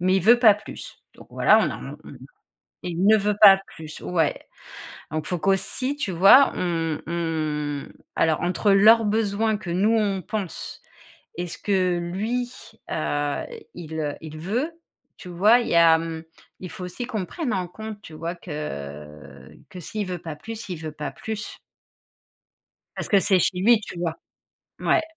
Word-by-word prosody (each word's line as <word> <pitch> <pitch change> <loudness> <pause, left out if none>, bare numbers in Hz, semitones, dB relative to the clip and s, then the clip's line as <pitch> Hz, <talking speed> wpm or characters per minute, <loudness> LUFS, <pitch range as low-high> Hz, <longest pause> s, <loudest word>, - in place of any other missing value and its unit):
Mais 185 +2 +3
il - - +2
veut 235 +6 +6
pas 220 -4 +7
plus. 210 - -10 0.2
Donc - - -16
voilà, - - +5
on - - +1
a - - -5
on - - -12
mmh - - -10
mh. - - -11 0.7
Il 180 +2 -1
ne 220 +1 +7
veut 210 0 0
pas 195 -2 +9
plus, 155 -1 -10
ouais. 165 -4 -1 0.7
Donc 155 0 -3
faut 180 - -2
qu'aussi, 195 - 0
tu 285 - -3
vois, 195 +11 +7
on 165 -3 -2
on 155 -3 -2 0.3
alors 160 -1 +2
entre 180 +4 +1
leurs 220 +3 +6
besoins 215 0 +1
que 200 -4 -7
nous 205 +6 +2
on 200 -3 0
pense 205 -1 -6 0.5
et 175 +1 -3
ce 170 - -8
que 185 -3 +1
lui, 215 +8 -2 0.4
heu, 145 -2 -2 0.3
il, 160 -2 -8
heu, 145 -2 -2
il 155 -1 -8
veut, 235 - -2 0.5
tu - - -10
vois? 200 +7 +4
Il 235 - -4
y - - 0
a, 165 -1 +6
mmh 165 -1 -5 0.4
il 185 - -7
faut 190 -4 -8
aussi 180 +7 -6
qu'on 215 -7 -3
prenne 305 - -3
en 180 -3 -2
compte 215 +3 -8
tu 160 - -12
vois, 165 +2 -4
que, 75 - -8
que 180 - -10
s'il 210 +4 -4
veut 180 -1 -4
pas 160 -2 -7
plus, 225 +6 -8
il 180 - -3
veut 155 -1 -6
pas 150 -2 -5
plus 210 +9 -6 1.4
parce - - -5
que 200 - +5
c'est 190 -1 +3
chez 180 +1 0
lui 220 +4 +5
tu 180 - -9
vois 170 -2 -2 0.6
ouais. - - +2
180 Hz, 180 wpm, -24 LUFS, 160-210 Hz, 1.4 s, pas